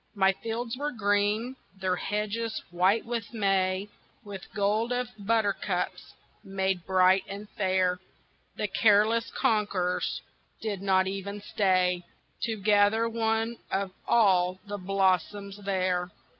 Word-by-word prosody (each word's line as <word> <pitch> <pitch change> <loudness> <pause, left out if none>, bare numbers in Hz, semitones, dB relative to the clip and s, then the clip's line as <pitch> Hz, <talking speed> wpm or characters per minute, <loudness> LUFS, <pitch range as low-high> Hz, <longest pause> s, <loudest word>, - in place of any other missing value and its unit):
My 195 -1 +4
fields 230 +3 -4
were 295 +2 -2
green, 210 +2 0 0.2
their 185 -1 0
hedges 215 +3 -2
white 185 +5 +2
with 230 -1 -4
May, 195 -2 +1 0.4
With 200 -3 -9
gold 215 +3 +1
of 245 0 -1
buttercups 205 -3 -1 0.3
made 190 -3 -2
bright 185 0 +4
and 200 +2 -7
fair, 185 -2 +1 0.6
The 210 - -1
careless 215 +3 +3
conquerors 200 -5 0 0.4
did 205 -4 -3
not 190 -1 +3
even 195 +1 -4
stay 185 -3 +1 0.4
To 225 -2 -3
gather 205 +2 +3
one 225 0 -1
of 195 0 -1 0.2
all 185 -5 +3
the 205 0 -5
blossoms 195 +1 0
there. 185 -2 0
200 Hz, 115 wpm, -28 LUFS, 190-220 Hz, 0.6 s, My